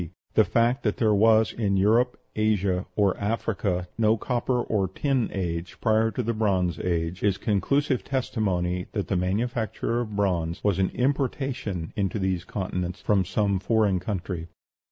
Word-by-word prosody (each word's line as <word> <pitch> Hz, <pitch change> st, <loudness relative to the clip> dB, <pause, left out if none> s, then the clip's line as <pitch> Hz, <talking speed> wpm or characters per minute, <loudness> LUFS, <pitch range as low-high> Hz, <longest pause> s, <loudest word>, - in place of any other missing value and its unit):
The -, -, +6 dB
fact 120 Hz, +3 st, +2 dB
that 105 Hz, -, -1 dB
there 110 Hz, -2 st, +3 dB
was 110 Hz, +1 st, +4 dB
in 100 Hz, -4 st, 0 dB
Europe, 115 Hz, +6 st, +3 dB, 0.2 s
Asia, 100 Hz, -4 st, +1 dB
or 100 Hz, -3 st, +3 dB
Africa 100 Hz, -4 st, -1 dB
no 110 Hz, 0 st, +4 dB
copper 125 Hz, +2 st, -1 dB
or 105 Hz, -5 st, 0 dB
tin 135 Hz, +3 st, 0 dB
age 85 Hz, -2 st, -4 dB
prior 110 Hz, 0 st, +3 dB
to 125 Hz, +2 st, -3 dB
the 115 Hz, +1 st, -1 dB
Bronze 95 Hz, -6 st, 0 dB
Age, 85 Hz, 0 st, -2 dB
is 100 Hz, -2 st, +2 dB
conclusive 130 Hz, +7 st, +1 dB
testimony 95 Hz, -9 st, -1 dB
that 100 Hz, -3 st, -2 dB
the 100 Hz, -, +1 dB
manufacture 115 Hz, +5 st, -1 dB
of 110 Hz, -4 st, -4 dB
bronze 85 Hz, -5 st, 0 dB
was 100 Hz, -3 st, +1 dB
an 95 Hz, -, +2 dB
importation 130 Hz, -, -1 dB
into 100 Hz, +1 st, -1 dB
those 95 Hz, -3 st, -1 dB
continents 90 Hz, -1 st, -3 dB
from 100 Hz, -3 st, +2 dB
some 100 Hz, -1 st, 0 dB
foreign 105 Hz, -1 st, +2 dB
country. 90 Hz, -3 st, -4 dB
105 Hz, 155 wpm, -26 LUFS, 90-115 Hz, 0.2 s, The